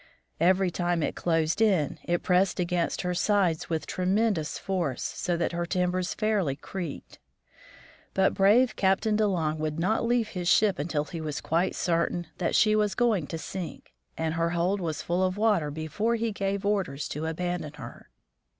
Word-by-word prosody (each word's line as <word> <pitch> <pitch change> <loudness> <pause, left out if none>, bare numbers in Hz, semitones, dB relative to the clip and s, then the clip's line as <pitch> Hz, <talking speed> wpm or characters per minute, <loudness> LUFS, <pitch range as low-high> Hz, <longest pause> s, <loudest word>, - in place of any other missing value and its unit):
Every 185 +2 +3
time 175 -2 0
it - - -2
closed 165 +3 0
in, 180 -9 +2
it 175 0 0
pressed 185 +1 +2
against 175 0 0
her 180 0 -1
sides 180 -3 +1
with 160 -3 -1
tremendous 185 -3 0
force, 175 -9 -2
so 175 -1 -2
that 170 - 0
her 170 0 -2
timbers 180 0 0
fairly 205 -10 0
creaked. 170 0 -7 1.0
But 190 0 +3
brave 215 +5 +4
Captain 195 +3 +2
De 215 0 +3
Long 160 -5 -1
would 155 0 -2
not 200 +6 +1
leave 230 -2 +1
his 180 -2 -4
ship 205 -1 +4
until 150 0 -1
he 165 +2 -6
was 150 -2 -3
quite 170 +4 0
certain 175 0 0
that 175 - 0
she 215 -1 +4
was 210 -1 +1
going 220 - +1
to 165 - -4
sink, 165 - -7 0.2
and 160 -1 -1
her 165 0 0
hold 175 +4 0
was 160 -4 -3
full 175 +2 0
of 185 +1 0
water 205 -8 +2
before 160 +10 -1
he 230 0 -1
gave 200 0 -2
orders 190 -9 -1
to 150 +2 -4
aban 175 +2 -2
don 150 -1 -7
her. - - -11
180 Hz, 175 wpm, -27 LUFS, 165-200 Hz, 1.0 s, brave